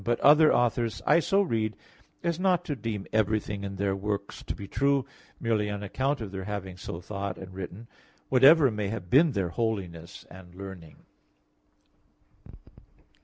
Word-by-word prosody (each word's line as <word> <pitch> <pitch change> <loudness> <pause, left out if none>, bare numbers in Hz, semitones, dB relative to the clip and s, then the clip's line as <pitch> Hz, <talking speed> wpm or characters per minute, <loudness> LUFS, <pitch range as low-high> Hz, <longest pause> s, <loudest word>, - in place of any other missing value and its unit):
But 120 +2 0
other 155 +2 +7
authors 120 -1 +1
I - - +5
so 195 +4 +2
read 110 - -1 0.5
as 170 -1 -1
not 180 -2 +2
to 150 - -2
deem 110 -4 -4
everything 105 -1 0
in 100 0 -5
their 100 0 0
works 100 0 -4
to - - -5
be 100 - -8
true, 140 +4 +1 0.3
merely 110 -3 0
on 105 0 -4
account 135 +7 -1
of 105 -4 -5
their 95 -1 -5
having 95 -3 -5
so 90 -1 -7
thought 100 0 -5
and 95 -1 -10
written, 95 +4 -7 0.4
whatever 135 +2 +6
may 105 -2 -2
have 100 -4 -6
been 150 +2 +5
their 95 -4 -1
holiness 95 -5 -4
and 90 -1 -13
learning." 95 -4 -10
105 Hz, 160 wpm, -28 LUFS, 95-130 Hz, 0.5 s, other